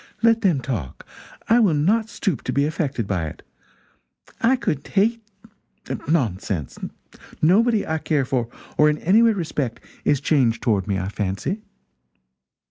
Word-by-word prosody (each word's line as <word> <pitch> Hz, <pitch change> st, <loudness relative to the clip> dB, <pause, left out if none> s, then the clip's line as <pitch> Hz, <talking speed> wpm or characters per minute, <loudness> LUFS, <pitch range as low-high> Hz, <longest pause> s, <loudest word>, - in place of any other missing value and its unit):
Let 230 Hz, 0 st, +4 dB
them 175 Hz, -10 st, +2 dB
talk 110 Hz, -, -5 dB, 0.4 s
I 230 Hz, +2 st, +5 dB
will 200 Hz, -9 st, +4 dB
not 215 Hz, +9 st, +2 dB
stoop 195 Hz, -, -2 dB
to -, -, -1 dB
be 140 Hz, +1 st, +2 dB
affected 145 Hz, -, -2 dB
by 90 Hz, -5 st, -1 dB
it. 75 Hz, -, -10 dB, 1.0 s
I 240 Hz, +3 st, +4 dB
could 150 Hz, -, -2 dB
hate. 225 Hz, +4 st, +1 dB, 0.9 s
Nonsense 100 Hz, -, -1 dB, 0.6 s
nobody 215 Hz, +7 st, +3 dB
I 160 Hz, 0 st, -1 dB
care 150 Hz, -4 st, 0 dB
for 125 Hz, -3 st, -1 dB, 0.3 s
or 150 Hz, 0 st, +6 dB
in 150 Hz, -, 0 dB
any 195 Hz, +9 st, +4 dB
way 230 Hz, -1 st, +5 dB
respect 150 Hz, -, -3 dB, 0.2 s
is 145 Hz, -2 st, +2 dB
changed 130 Hz, -6 st, +1 dB
toward 100 Hz, -4 st, +1 dB
me, 100 Hz, -2 st, 0 dB
I 95 Hz, 0 st, -2 dB
fancy." 100 Hz, -, -3 dB
150 Hz, 145 wpm, -22 LUFS, -, 1.0 s, or